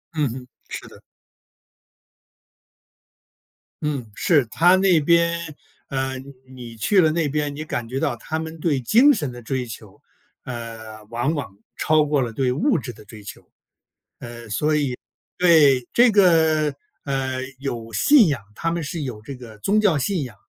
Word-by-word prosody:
嗯 150 -5 +1
哼， 125 +1 -8 0.2
是 - - -7
的。 - - -16 2.8
嗯， 135 -7 -3
是 145 -2 +3
它 175 +3 +4
那 185 -4 +4
边 170 +2 +3 0.5
呃， 135 -1 -2 0.3
你 120 -3 -11
去 190 - +3
了 155 -2 +3
那 165 -1 0
边， 145 0 -2
你 155 +2 -6
感 120 -6 -4
觉 130 +2 -3
到 135 - 0
他 160 +6 -4
们 160 0 -6
对 145 -6 +1
精 240 - +5
神 145 - -2
的 120 0 -9
追 130 +2 -3
求， 115 -3 -11 0.4
呃， 115 -3 -8
往 120 +6 -1
往 125 -8 -5 0.2
超 155 -1 +2
过 145 -1 +1
了 120 -2 -2
对 125 +2 0
物 220 - +1
质 120 0 -7
的 105 - -15
追 105 0 -13
求。 100 - -10
呃， - - -42 1.8
所 - - +5
以 145 -6 +6
对， 120 - -19
这 240 -1 +5
个， 160 -6 +3 0.3
呃， 135 -2 -2 0.2
有 115 -5 -5
信 240 - +5
仰， 140 -8 -1
他 165 - -2
们 170 -1 -2
是 155 0 -4
有 120 -5 -6
这 140 +6 -8
个 115 -4 -12
宗 205 - +2
教 195 -8 +3
信 175 +5 -1
仰， 120 -4 -11
140 Hz, 175 characters per minute, -22 LUFS, 120-165 Hz, 2.8 s, 以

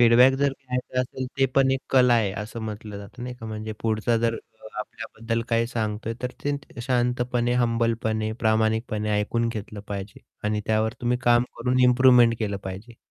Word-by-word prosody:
Feedback 120 +2 +7
जर 140 -1 +2
घ्यायचं 130 -1 -3
असेल, 130 0 -4
ते 135 - +5
पण 135 -1 +4
एक 135 0 0
कला 125 -2 +5
आहे 110 -4 +2
असं 115 +2 -7
म्हटलं 105 -1 -6
जातं 100 +5 -10
नाही 125 0 -5
का, 115 -2 -9
म्हणजे 110 0 -5
पुढचा 115 +1 +1
जर 115 0 +1
अ, 110 -1 -12
आपल्याबद्दल 115 +1 -4
काही 115 0 +2
सांगतोय 110 -1 -3
तर 125 - -1
ते 145 -4 -4
शांतपणे, 125 -1 0
हंबलपणे, 115 -2 0
प्रामाणिकपणे 110 -1 +1
ऐकून 115 +2 0
घेतलं 105 -2 -6
पाहिजे 100 0 -6 0.2
आणि 105 0 0
त्यावर 110 0 +1
तुम्ही 125 0 +1
काम 120 -1 +4
करून 125 +2 +1
इम्प्रूव्हमेंट 125 -2 +6
केलं 100 -3 -1
पाहिजे. 100 +5 -8
115 Hz, 170 wpm, -25 LUFS, 110-125 Hz, 0.2 s, Feedback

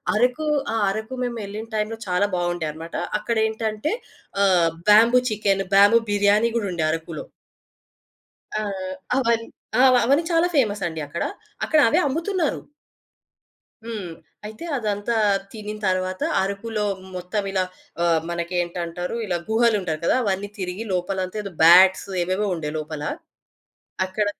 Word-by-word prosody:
అరకు, 250 +7 +1 0.3
ఆ - - 0
అరకు 220 +4 -4
మేమెళ్ళిన 220 -2 -5
టైంలో 215 +1 -1
చాలా 180 +2 +2
బావుండే 175 -1 -1
అన్నమాట. 165 +2 -9 0.2
అక్కడెంటంటే 220 +3 -1 0.5
ఆహ్, 180 -4 +4 0.2
బ్యాంబూ 230 +4 +7
చికెన్, 200 -2 +1
బ్యాంబూ 205 +4 +7
బిర్యానీ 205 +2 +3
గూడా 215 -4 0
ఉండే 170 -3 -2
అరకులో. 165 - -4 1.3
ఆ! - - 0 0.6
అవన్ 230 -3 +2 0.4
ఆ! - - +7 0.2
అవన్నీ 280 +6 +3
చాలా 335 +1 +3
ఫేమసండి 205 - 0
అక్కడ. 170 +4 -3 0.4
అక్కడ 310 - +3
అవే - - +3
అమ్ముతున్నారు. 330 +3 -1 1.2
హ్మ్. 220 -5 -5 0.4
అయితే 220 +9 -8
అదంతా 210 0 -1 0.4
తినినతర్వాత 190 -4 -2 0.2
అరుకులో 210 +3 -2 0.3
మొత్తం 180 +3 -3
ఇలా 190 -1 +1 0.4
ఆహ్, 165 -2 +3
మనకేంటంటారు? 175 +1 -3
ఇలా 180 -4 -1
గుహలుంటారు 215 -8 +2
కదా! - - +3
అవన్నీ 200 0 -1
తిరిగి 185 +3 -4
లోపలంతా 185 +2 -2
ఏదో 200 - -6
బ్యాట్స్ 185 +4 +7
ఏవేవో 185 +4 0
ఉండే 150 -3 -4
లోపల. 155 -1 -5 1.0
అక్కడ 205 +3 -1
205 Hz, 120 wpm, -23 LUFS, 180-225 Hz, 1.3 s, బ్యాంబూ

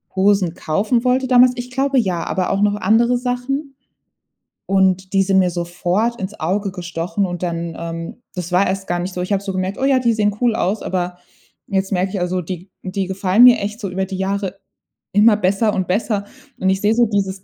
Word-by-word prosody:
Hosen 190 -3 +2
kaufen 215 +9 0
wollte 255 +1 +2
damals. 250 0 +6
Ich 250 0 -6
glaube 270 +1 0
ja, 185 -7 -1
aber 185 -1 -1
auch 195 - 0
noch 205 0 +3
andere 230 +3 +3
Sachen, 265 +3 -3 0.9
und 190 -1 +1
die 195 0 +4
sind 190 0 +3
mir 185 -1 +3
sofort 175 +6 -1
ins 195 +3 -6
Auge 195 +4 -1
gestochen 180 +3 -3
und 175 -1 -5
dann 170 -1 -3
ähm, 165 +7 -6
das 180 -1 -5
war 190 +2 +4
erst 195 +1 -3
gar 175 0 -1
nicht 180 +2 -4
so. 180 - -3
Ich 180 +3 -1
habe 200 0 0
so 195 - -3
gemerkt: 185 +1 -2
„Oh - - -2
ja, 270 -1 +4
die 235 -2 +2
sehen 210 -2 +1
cool 240 -3 +2
aus“, 205 0 -1
aber 180 -1 -3 0.5
jetzt 190 0 -1
merke 185 0 0
ich, 195 - -3
also, 180 +1 -1
die 180 +2 -7
die 190 0 -3
gefallen 190 +4 +3
mir 250 -1 +8
echt 210 +2 -4
so 195 - -3
über 190 +1 -2
die 190 0 -6
Jahre 195 0 -2 0.5
immer 210 +2 +6
besser 205 +2 +1
und 185 -2 -1
besser, 205 +1 0 0.4
und 190 - +1
ich 190 0 +1
sehe 210 +2 +2
so 240 0 +4
dieses 195 -2 -2
195 Hz, 215 wpm, -19 LUFS, 185-220 Hz, 0.9 s, mir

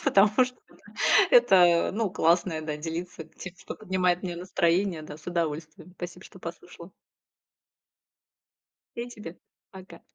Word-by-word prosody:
потому 200 +2 +5 0.2
что, 250 0 -9
ну, - - -21 0.5
это, 480 - +6
э, 175 -2 +5
ну, 215 -1 -1
классно, 170 -1 +1
да, 155 -1 -4
делиться 165 +2 -6
тем, 175 +3 -11
что - - -8
поднимает 185 -3 0
мне 175 -2 -4
настроение, 175 0 0
да, 155 -1 -9
с 155 - -19
удовольствием. 165 0 -4
Спасибо, 180 +1 -8
что 190 - -14
послушала. 170 0 -10 2.1
И 240 +1 -4
тебе 210 -7 -10 0.3
пока. 190 -1 -13
175 Hz, 135 wpm, -27 LUFS, 165-190 Hz, 2.1 s, это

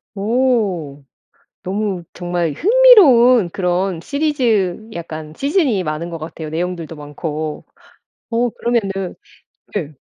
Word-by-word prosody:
어. 200 - 0 0.6
너무 195 -1 -2
정말 175 -2 -2
흥미로운 290 - +6
그런 180 -1 -1
시리즈 230 - 0
약간 155 -2 -7
시즌이 280 - +1
많은 155 +2 -3
것 170 - -5
같아요 160 0 -7
내용들도 165 0 -4
많고. 150 +1 -5 0.7
어. 235 +1 +1
그러면은 195 -6 -2 0.6
네. 160 -8 -3
190 Hz, 220 characters per minute, -18 LUFS, 165-240 Hz, 0.7 s, 흥미로운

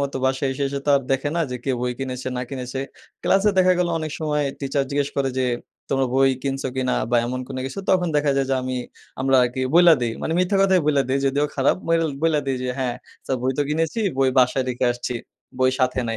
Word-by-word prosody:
মতো 140 -1 -2
বাসায় 135 +1 0
এসে, 140 +2 -4
এসে 140 0 -4
তো - - +3 0.2
দেখে 135 +2 +1
না - - +1
যে 125 - -3
কে 135 - 0
বই 125 0 -1
কিনেছে, 130 -1 -4
না 125 - -2
কিনেছে। 130 0 -4 0.4
ক্লাসে 195 +2 +3
দেখা 185 0 +5
গেল 180 - +1
অনেক 155 -1 -4
সময় 150 -1 0 0.2
টিচার 140 0 0
জিজ্ঞেস 140 0 0
করে 135 -1 +1
যে, 130 - +2 0.4
"তোমরা 135 -1 +1
বই 135 0 +5
কিনছো 135 -1 -2
কিনা?" 130 -1 0 0.2
বা, 120 - +4
এমন 130 +1 -3
কোনো 130 -1 -5
কিছু। 135 - -7
তখন 180 -2 +3
দেখা 145 -1 +2
যায় 135 - +1
যে, 135 - +3
আমি 130 0 -3 0.5
আমরা 135 0 +3
আরকি 125 +1 -1
বইলা 175 -1 +8
দেই। 115 -2 0
মানে - - -1
মিথ্যা 185 +2 +2
কথাই 190 -2 +4
বইলা 145 -2 +3
দেই। 135 +1 +1
যদিও 140 +2 +1
খারাপ। 135 0 +2
বল 165 0 +3 0.2
বইলা 160 -2 +3
দেই 135 -1 0
যে, 125 - -2
হ্যাঁ, 125 -2 -1 0.3
"স্যার 130 - 0
বই 130 - +1
তো 145 - +4
কিনেছি। 165 +8 -1 0.2
বই 135 -1 +4
বাসায় 130 +1 +3
রেখে 125 0 -1
আসছি। 120 0 -4 0.4
বই 130 0 +4
সাথে 130 0 +1
নাই।" 115 - -2
135 Hz, 230 wpm, -22 LUFS, 130-150 Hz, 0.5 s, বইলা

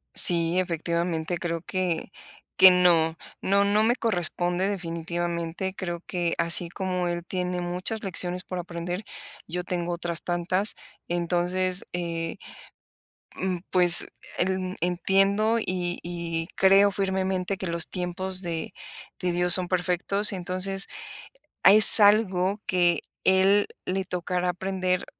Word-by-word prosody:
Sí, 170 +1 +4
efectivamente, 170 -1 -3
creo 170 -1 -4
que 180 -1 -3 0.5
que 190 0 +9
no. 170 -3 +3 0.3
No, 200 +1 +2
no 210 +2 +2
me 240 +2 +2
corresponde 180 -4 -2
definitivamente, 170 0 -4
creo 175 -3 -5
que 175 -2 -2
así 170 0 +2
como 180 -1 -3
él 175 0 -4
tiene 180 -1 -3
muchas 180 +5 -3
lecciones 180 -1 -2
por 185 -1 -6
aprender, 175 +2 -6 0.4
yo 180 +2 -5
tengo 175 -1 -4
otras 170 -1 -1
tantas. 180 +4 -1 0.3
Entonces, 180 +2 -1
eh, 170 -1 -4 1.0
mm, 185 -1 -3
pues, 175 -2 +6 0.3
elm 185 0 -2
entiendo, 195 +5 +1
y 180 -3 -3
y 170 -1 -4
creo 195 +1 +4
firmemente 190 0 -2
que 190 - -5
los 170 -1 +2
tiempos 185 +1 -2
de 165 -3 -5 0.5
de 180 - -2
Dios 175 0 +3
son 180 0 +4
perfectos. 185 +3 +1
Entonces 190 +1 -1 0.8
a 195 - +7
es 215 +1 +10
algo 205 -1 +2
que 175 -2 +2 0.2
él 195 +2 +3 0.2
le 190 +1 -2
tocará 180 0 -3
aprender, 185 0 -3
180 Hz, 125 wpm, -25 LUFS, 175-190 Hz, 1.0 s, es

